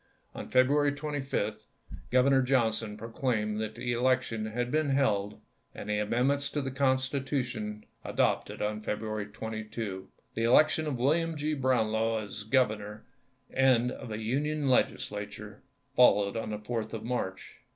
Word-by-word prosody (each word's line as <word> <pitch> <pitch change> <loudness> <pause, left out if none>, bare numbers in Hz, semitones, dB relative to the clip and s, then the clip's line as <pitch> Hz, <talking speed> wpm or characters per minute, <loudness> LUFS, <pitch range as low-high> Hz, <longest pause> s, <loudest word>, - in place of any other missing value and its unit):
On - - -7
February 145 +3 +4
25, 135 -8 -3 0.4
Grovernor 130 +2 +5
Johnson 115 -4 +1
pro 115 +2 -7
claimed 110 -4 -1
that 110 0 -4
the 120 0 -2
election 120 -3 +1
had 120 +3 -2
been 155 0 +1
held 105 -7 +1 0.4
and - - -7
the 105 - +1
amendments 130 +7 +1
to 150 - -2
the 135 - -3
constitution 130 -5 -1 0.2
adopted - - 0
on 105 0 -2
Febru 105 +1 -3
ary 105 -1 -2
22. 110 -2 -5 0.2
The 115 - -2
election 155 +6 +4
of 140 -4 -2
William 160 +6 +1
G. 150 +1 -1
Brownlow 115 -5 +1
as 105 0 -6
governor, 110 -3 0 0.5
and 125 -2 +3
of - - -8
a 110 - -3
Union 145 +6 -1
Legislature, 105 -5 -1 0.3
followed 105 -4 +5
on 115 -1 -3
the 105 - -3
4th 110 +1 -4
of 110 -1 -5
March. 115 -6 -4
120 Hz, 145 wpm, -30 LUFS, 110-135 Hz, 0.5 s, Grovernor